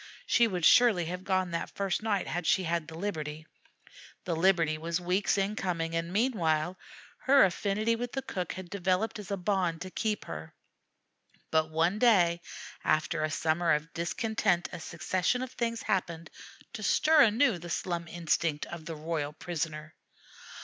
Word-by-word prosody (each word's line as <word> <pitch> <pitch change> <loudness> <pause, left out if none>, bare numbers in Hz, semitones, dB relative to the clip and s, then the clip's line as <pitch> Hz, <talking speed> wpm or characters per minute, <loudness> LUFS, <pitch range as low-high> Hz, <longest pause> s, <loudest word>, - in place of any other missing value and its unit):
She 235 -1 +4
would 180 -6 -1
surely 225 -9 +6
have 180 +2 -5
gone 185 -2 0
that 170 - -3
first 195 -1 -1
night 215 -3 0
had 175 -1 -3
she 190 - +3
had 170 -2 -1
the 160 - -9
liberty. 155 -5 -4 0.8
The 175 -3 -1
liberty 165 -2 +3
was 165 +2 -2
weeks 180 +4 +1
in 200 +2 0
coming, 165 -5 -2
and, 165 +1 -2
meanwhile, 180 -7 +1 0.4
her 275 -4 +6
affinity 210 +5 0
with 240 +1 -5
the 270 - -3
cook 180 -5 -4
had 185 -1 -9
developed 195 +3 0
as 205 - -9
a 200 - -1
bond 180 -3 0
to 185 0 -6
keep 215 0 -2
her; 80 -1 -8 1.0
but 160 0 +2
one 165 +6 +1
day 175 -8 +4 0.4
after 155 +1 +1
a 155 - 0
summer 160 +3 +1
of 150 +2 -2
discontent 195 +1 0
a - - -6
succession 180 +8 -1
of 255 - -6
things 230 -2 -2
happened 170 -5 -2 0.4
to 230 - -6
stir 305 +8 +4
anew 230 -3 +4
the 175 +1 -9
slum 170 0 -2
instinct 165 -2 -1
of 170 -2 -9
the 165 - -5
royal 155 -1 -3
prisoner. 155 -2 -5
175 Hz, 165 wpm, -29 LUFS, 165-205 Hz, 1.0 s, surely